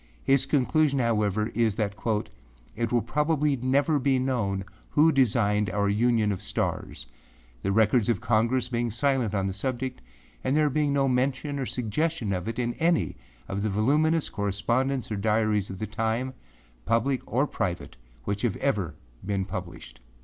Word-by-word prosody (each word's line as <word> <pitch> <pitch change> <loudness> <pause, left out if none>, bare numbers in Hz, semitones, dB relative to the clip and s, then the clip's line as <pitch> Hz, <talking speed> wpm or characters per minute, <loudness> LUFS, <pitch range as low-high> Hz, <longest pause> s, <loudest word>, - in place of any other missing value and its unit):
His 135 0 +3
conclusion, 145 +1 +2
however, 110 -3 +1
is 115 -3 +1
that 105 -3 -1
âit 105 - -4
will 120 -3 +2
probably 150 +3 +1
never 140 +4 +2
be 135 0 +2
known 110 -7 -1 0.2
who 155 +2 +4
designed 105 -6 +2
our 100 +2 0
union 110 0 +2
of 95 - -4
stars, - - -3 0.6
the 100 - -1
records 110 +2 +3
of 120 - +2
Congress 120 +2 +1
being 120 -1 -1
silent 125 -2 0
on 95 -1 0
the 95 - -2
subject 130 +4 -3 0.4
and 130 +3 +1
there 150 -2 +3
being 150 +1 +1
no 140 -1 +2
mention 135 +3 0
or 130 - -2
suggestion 125 -1 -1
of 90 0 -3
it 115 - -3
in 120 -1 -1
any 165 0 +2 0.3
of 100 +1 -3
the 105 - 0
voluminous 150 +10 +2
correspondence 115 +7 -1
or 105 - -1
diaries 105 -1 +1
of 95 - -6
the 110 - -3
time, 115 +4 -2 0.5
public 120 - +1
or 130 +4 +2
private, 90 -10 -3 0.3
which 100 +6 -2
have 115 -5 0
ever 105 - -1 0.3
been 100 -1 -1
published. 90 -10 -7
115 Hz, 160 wpm, -27 LUFS, 105-135 Hz, 0.6 s, who